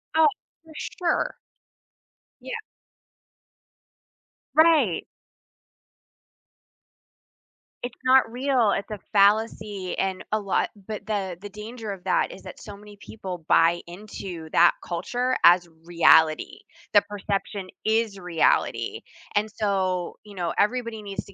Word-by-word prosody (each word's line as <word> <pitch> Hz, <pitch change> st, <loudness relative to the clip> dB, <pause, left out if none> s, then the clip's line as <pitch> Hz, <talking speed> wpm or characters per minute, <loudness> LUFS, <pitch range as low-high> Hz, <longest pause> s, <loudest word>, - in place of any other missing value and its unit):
Oh, 320 Hz, -1 st, +6 dB, 0.4 s
for 320 Hz, -1 st, -16 dB
sure. 345 Hz, +2 st, -2 dB, 1.0 s
Yeah. -, -, -7 dB, 2.0 s
Right. 315 Hz, -, +4 dB, 2.8 s
It's 245 Hz, 0 st, -6 dB
not 255 Hz, -3 st, +5 dB
real, 250 Hz, -3 st, +2 dB
it's 200 Hz, -, -3 dB
a 210 Hz, -, -5 dB
fallacy 205 Hz, -2 st, +2 dB
and 190 Hz, -1 st, -1 dB
a 215 Hz, -, +2 dB
lot 200 Hz, -2 st, 0 dB, 0.2 s
but 215 Hz, -2 st, -6 dB
the 195 Hz, -4 st, -2 dB
the 205 Hz, -, -7 dB
danger 215 Hz, +2 st, -7 dB
of 195 Hz, -2 st, -7 dB
that, -, -, +1 dB
is -, -, -11 dB
that -, -, -10 dB
so 205 Hz, -3 st, -9 dB
many 210 Hz, 0 st, -14 dB
people 185 Hz, -6 st, -7 dB
buy 165 Hz, +1 st, +4 dB
into 175 Hz, -3 st, -8 dB
that 175 Hz, +1 st, +7 dB
culture 245 Hz, +9 st, -2 dB
as 175 Hz, 0 st, +6 dB, 0.2 s
reality, 165 Hz, -2 st, +4 dB, 0.3 s
the 205 Hz, -, +7 dB
perception 200 Hz, -1 st, -4 dB, 0.2 s
is 220 Hz, -2 st, +1 dB
reality, 175 Hz, -3 st, 0 dB, 0.3 s
and, 210 Hz, +1 st, +1 dB
so, 190 Hz, -4 st, -1 dB
you 210 Hz, -, -13 dB
know, 175 Hz, -3 st, -2 dB
everybody 230 Hz, +1 st, 0 dB
needs 200 Hz, -1 st, -6 dB
to 200 Hz, -, -15 dB
205 Hz, 120 wpm, -25 LUFS, 185-225 Hz, 2.8 s, that